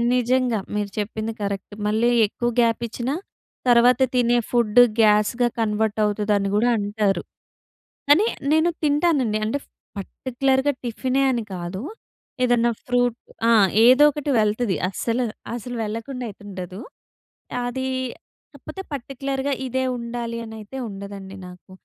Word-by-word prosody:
నిజంగా. 250 -2 +1 0.2
మీరు 205 -1 -1
చెప్పింది 220 +2 -3
కరెక్ట్. 200 0 -4
మళ్ళీ 220 +3 +2 0.2
ఎక్కువ 240 +3 -2
గాప్ 230 -1 +2
ఇచ్చినా, 240 +4 -3 0.5
తర్వాత 245 +1 +5
తినే 245 -1 +3
ఫుడ్ 235 -1 +3 0.2
గ్యాస్‌గా 215 +3 +4
కన్వర్ట్ 220 -1 0
అవుతుదని 205 -1 +1
కూడా 230 +4 +3
అంటారు. 205 -3 0 0.9
కానీ 325 +9 +6 0.3
నేను 315 +2 +4
తింటానండి. 290 -7 +2
అంటే 230 +6 -1 0.4
పర్టిక్యులర్‌గా 265 +6 0
టిఫినే 255 +3 0
అని 240 -3 -1
కాదు. 175 +2 -5 0.6
ఏదన్నా 240 -1 +3 0.2
ఫ్రూట్ 245 -1 +1 0.3
ఆహ్, 215 -4 +6 0.2
ఏదో 260 +4 +7
ఒకటి 295 0 -4
వెళ్తది 215 -1 +1
అస్సలు, 230 +5 -1 0.3
అసలు 245 +1 -6
వెళ్ళకుండా 230 +4 -5
అయితే 205 - -13
ఉండదు. 185 0 -7 0.9
అదీ 260 +2 -3 0.7
కాకపోతే 385 - -8
పర్టిక్యులర్‌గా 275 +1 -3
ఇదే 260 +1 -1
ఉండాలి 235 0 -4
అనైతే 220 +3 -9
ఉండదండి 195 -1 -8
నాకు. 180 +1 -14
235 Hz, 120 wpm, -23 LUFS, 210-255 Hz, 0.9 s, ఏదో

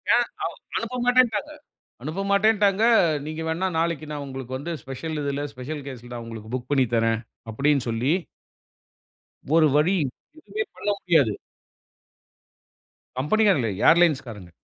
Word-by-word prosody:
ஏன் - - +3 0.2
அவ - - 0 0.3
அனுப்பமாட்டேன்டாங்க 245 +1 +1 0.5
அனுப்பமாட்டேன்டாங்க, 200 - +2 0.4
நீங்க 155 +1 -5
வேண்ணா 165 +4 0
நாளைக்கு 165 -2 -1
நான் 145 -1 -4
உங்களுக்கு 130 -1 -6
வந்து, 165 +5 -5
ஸ்பெஷல் 150 +4 -5
இதில 140 0 -2
ஸ்பெஷல் 145 +4 -6
கேஸ்ல 125 -3 -9
நான் 120 -1 -6
உங்களுக்கு 110 -1 -9
புக் 125 -1 -4
பண்ணி 135 -3 +4
தரறேன் 115 -1 +2 0.3
அப்டினு 140 +3 +1
சொல்லி 115 +5 +1 1.4
ஒரு 160 -2 +6
வழி 160 +6 +4 0.4
எதுமே 425 +7 -4
பண்ண - - -3
முடியாது. 150 - +3 1.9
கம்பெனிகாரங்க 165 - +3
இல்ல, 95 - -6
ஏர்லைன்ஸ்காரங்க. 135 - +1
150 Hz, 120 wpm, -24 LUFS, 125-190 Hz, 1.9 s, ஒரு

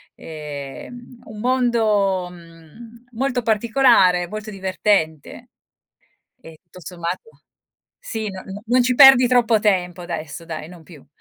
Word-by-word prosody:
Ehm, 155 - -9
un 215 -1 -11
mondo, 220 -7 +1
mhmm, 170 +8 -16
molto 250 +1 -2
particolare, 220 -6 +3
molto 215 0 -7
divertente 190 -5 -2 0.9
e 160 -1 -14
tu 185 - -13
sommato 175 - -6 0.7
sì, 220 - -5
no 190 -1 -9
no 195 +2 -9
non 250 +1 +3
ci 250 0 0
perdi 270 -2 +8
troppo 235 -3 +3
tempo 180 -4 0
adesso 165 -1 -7
dai, 160 -1 -7
non 175 -3 -14
più. 155 -5 -16
200 Hz, 125 wpm, -20 LUFS, 170-235 Hz, 0.9 s, perdi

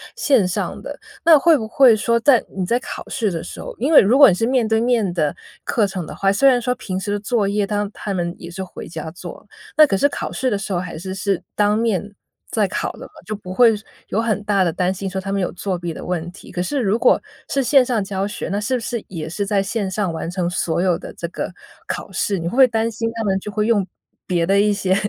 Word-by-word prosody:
线 250 -10 +3
上 180 - -3
的。 - - -6 0.3
那 330 -2 +8
会 325 +1 +5
不 220 - -4
会 250 -2 +6
说 235 +2 +1
在 250 -1 +4
你 190 - -1
在 235 +7 +1
考 - - -7
试 220 -7 -1
的 165 -1 -4
时 - - -9
候 - - -8
因 270 +7 0
为 310 - +9
如 225 +7 +3
果 280 -1 +10
你 - - +3
是 225 - 0
面 250 -2 +2
对 220 0 +2
面 230 -5 +1
的 155 -4 0 0.3
课 215 -4 +1
程 185 -3 -5
的 - - -8
话， 195 0 +2
虽 245 +8 +4
然 250 -2 +4
说 250 +1 0
平 190 -6 -4
时 205 +1 -3
的 205 - -1
作 210 -1 0
业， 205 0 +1
他 205 0 -2
他 205 - -5
们 175 -2 -2
也 170 - -9
是 190 +2 -5
回 185 - -9
家 160 -1 -6
做， 175 - -10 0.3
那 305 -1 +8
可 195 - +1
是 285 - +4
考 - - -4
试 255 -1 -1
的 205 - +1
时 200 - -5
候 - - +1
还 180 -1 -6
是 190 +3 -6
是 195 -1 -1
当 210 0 +2
面， 205 -3 -1 0.4
在 - - +1
考 - - -2
的 - - -14
嘛， - - -15
就 215 - -4
不 185 -3 -9
会 230 +1 +5
说 210 - -10 0.2
有 220 - 0
很 215 -2 -1
大 200 -2 +2
的 170 - +1
担 180 +3 0
心 190 0 -4
说 190 +1 -3
他 195 +1 -5
们 195 - 0
有 180 - -1
作 185 +1 -3
弊 175 -1 -4
的 - - -8
问 175 -2 -3
题。 185 - -14
可 180 -1 -3
是 275 +11 -1
如 220 -1 +1
果 - - +4 0.3
是 275 - +1
线 270 +1 +5
上 235 -5 0
教 195 0 -2
学， 205 - -5
那 200 +1 -1
是 220 +5 -1
不 - - -1
是 230 -1 -4
也 160 -4 -6
是 195 +5 -3
在 195 -1 +1
线 200 -1 -2
上 190 -2 -1
完 165 0 -4
成 175 -1 -2
所 170 -1 -1
有 180 -3 +2
的 - - -8
这 170 - -5
个 - - -4 0.4
考 - - -5
试， 195 +2 -1
你 165 - -5
会 - - -2
不 245 - -5
会 265 - +8
担 225 -1 0
心 230 +1 -2
他 225 - -2
们 190 -2 +1
就 210 - -7
会 210 +1 0
用 215 -4 +2 0.4
别 170 -2 +1
的 195 +2 +3
一 210 0 +3
些 190 -2 +1
205 Hz, 295 characters per minute, -20 LUFS, 185-230 Hz, 0.4 s, 果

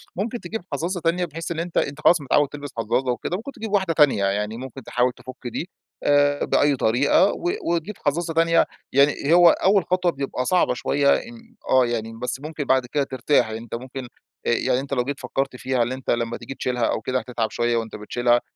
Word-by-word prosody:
ممكن 225 +6 -3
تجيب 225 -1 -5
حظّاظة 180 +2 -2
تانية 170 +2 +1
بحيث 165 +1 -6
إن 165 - -3
أنت 170 0 -4
أنت 145 +1 -1
خلاص 170 +1 +5
متعوّد 145 +1 +2
تلبس 145 -1 -7
حظّاظة 120 +3 0
وكده، 125 +8 -3
ممكن 250 +7 -7
تجيب 220 -5 -7
واحدة 190 -4 +2
تانية 145 -10 +4
يعني 105 +3 -1
ممكن 130 +1 -8
تحاول 125 +2 +1
تفُك 130 0 -11
دي 160 +8 -4 0.3
آآ، 145 0 +3
بأي 145 -1 +3
طريقة 135 - +3
و 350 - -2 0.2
وتجيب 170 +5 -1
حظّاظة 165 +3 0
تانية، 165 +1 +4 0.3
يعني 140 +2 +3
هو 175 0 +8
أول 195 +2 +3
خطوة 180 -1 +1
بيبقى 135 -3 -3
صعبة 180 -6 +2
شوية 140 +3 +1
إن 235 0 -9
آه 130 -1 +5
يعني، 115 -1 -3
بس 125 +1 -3
ممكن 155 -1 -4
بعد 130 -2 +2
كده 140 +3 0
ترتاح 130 0 +1
يعني 110 0 -5
أنت 115 - -6
ممكن 130 +1 -7 0.4
يعني 120 +1 +2
أنت 140 +1 -5
لو 125 -2 +1
جيت 140 +2 -4
فكّرت 135 -1 -2
فيها 130 -1 0
إن 120 - -3
أنت 130 0 -6
لما 120 0 0
تيجي 135 - -8
تشيلها 125 -2 -2
أو - - -1
كده 130 +3 -1
هتتعب 115 -2 -3
شوية 120 +1 0
وأنت 115 -1 -4
بتشيلها 120 +3 +1
140 Hz, 205 wpm, -23 LUFS, 125-165 Hz, 0.4 s, هو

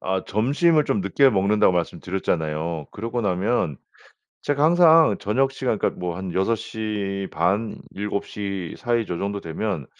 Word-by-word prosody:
아 95 0 -1
점심을 145 - +2
좀 105 - 0
늦게 130 +8 +3
먹는다고 100 -1 +3
말씀드렸잖아요. 85 -3 -2
그러고 115 +3 -3
나면 95 - 0 0.6
제가 145 0 0
항상 165 - +6
저녁 130 +6 +1
시간 130 -5 -2
그러니까 - - -1
뭐 90 -1 -3
한 95 -1 -6
6:30 100 -1 -1
7:00 100 -2 -4
사이 120 -2 0
저 90 - -3
정도 100 +2 -3
되면 80 -2 -3
100 Hz, 265 characters per minute, -23 LUFS, 90-115 Hz, 0.6 s, 항상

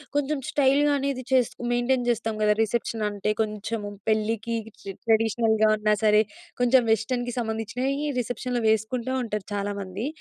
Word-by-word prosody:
కొంచెం 290 +1 +1
స్టైల్ 280 -2 +3 0.2
అనేది 275 -2 -2
చేసు 255 -3 +3 0.2
మెయింటైన్ 245 0 +1
చేస్తాం 225 -1 0
కద. 210 - +3
రిసెప్షన్ 225 0 -1
అంటే 205 +1 -1
కొంచెం 215 +1 -3 0.3
పెళ్ళికి 220 +1 0 0.5
ట్రెడిషనల్‌గా 220 -1 +3
ఉన్నా 210 0 +2
సరే 210 0 +6 0.4
కొంచెం 245 +1 +5
వెస్టర్న్‌కి 245 +2 0
సంబంధించినవి 245 +6 -2
రిసెప్షన్‌లో 245 0 -2
వేసుకుంటూ 230 +4 0
ఉంటారు 210 -3 -4
చాలామంది. 200 +2 -3
225 Hz, 125 wpm, -25 LUFS, 215-250 Hz, 0.5 s, సరే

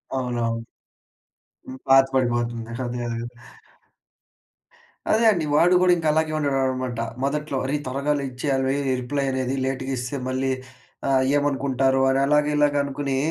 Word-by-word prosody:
అవునవును. 120 -3 -2 1.2
పాత 135 0 +7
పడిపోతుంది. 120 -2 -1 0.2
అదే 120 0 -4
అదే. 115 0 -3 1.9
అదే 225 +2 +3
అండి. 175 -6 -1
వాడు 175 +4 +5
కూడా 185 -1 +5
ఇంకా 165 -2 -2
అలాగే 160 0 +1
ఉండేవాడన్నమాట 130 -4 -1 0.2
మొదట్లో. 150 0 -1
"అరే, 135 +3 -1
త్వరగా 140 +3 -1 0.2
ఇచ్చేయాలి. 135 0 -1 0.3
రిప్లై 140 +3 -2
అనేది 130 0 -1
లేట్‌గా 135 0 -3
ఇస్తే 125 +3 -4
మళ్లీ 130 +1 -1 0.6
ఆహ్, 135 -1 +3
ఏమనుకుంటారో" 135 -2 +1
అని 135 0 +2
అలాగా 150 0 +3
ఇలాగ 145 -1 +2
అనుకుని, 140 -1 -2
135 Hz, 120 wpm, -23 LUFS, 130-145 Hz, 1.9 s, పాత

